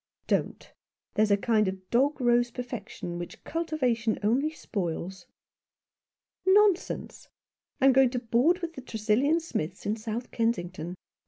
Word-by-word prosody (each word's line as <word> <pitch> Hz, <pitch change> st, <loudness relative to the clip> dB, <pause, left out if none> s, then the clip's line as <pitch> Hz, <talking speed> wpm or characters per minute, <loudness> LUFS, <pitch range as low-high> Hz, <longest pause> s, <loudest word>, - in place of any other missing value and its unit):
" -, -, -50 dB
Don't. -, -, -5 dB, 0.4 s
There 215 Hz, -, +1 dB
is 215 Hz, -, +4 dB
a 200 Hz, -, +4 dB
kind 215 Hz, -1 st, +2 dB
of 190 Hz, 0 st, -5 dB
dog 275 Hz, +5 st, +2 dB
rose 240 Hz, -1 st, +3 dB
perfection 230 Hz, -8 st, -6 dB
which 175 Hz, -, -8 dB
cultivation 260 Hz, -9 st, 0 dB
only 255 Hz, +8 st, +2 dB
spoils." 185 Hz, -, -5 dB, 0.6 s
" -, -, -66 dB
Nonsense! 400 Hz, -1 st, +2 dB, 0.5 s
I 270 Hz, -, +3 dB
am 270 Hz, -, +7 dB
going 265 Hz, -1 st, +5 dB
to 250 Hz, 0 st, -2 dB
board 250 Hz, +11 st, +2 dB
with 335 Hz, -1 st, -3 dB
the 265 Hz, -, -8 dB
Tresillian 240 Hz, +7 st, +1 dB
Smiths 185 Hz, -, -4 dB
in 210 Hz, -, 0 dB
South 225 Hz, +2 st, -5 dB
Kensington." 180 Hz, -7 st, -2 dB
235 Hz, 150 wpm, -28 LUFS, 205-270 Hz, 0.6 s, am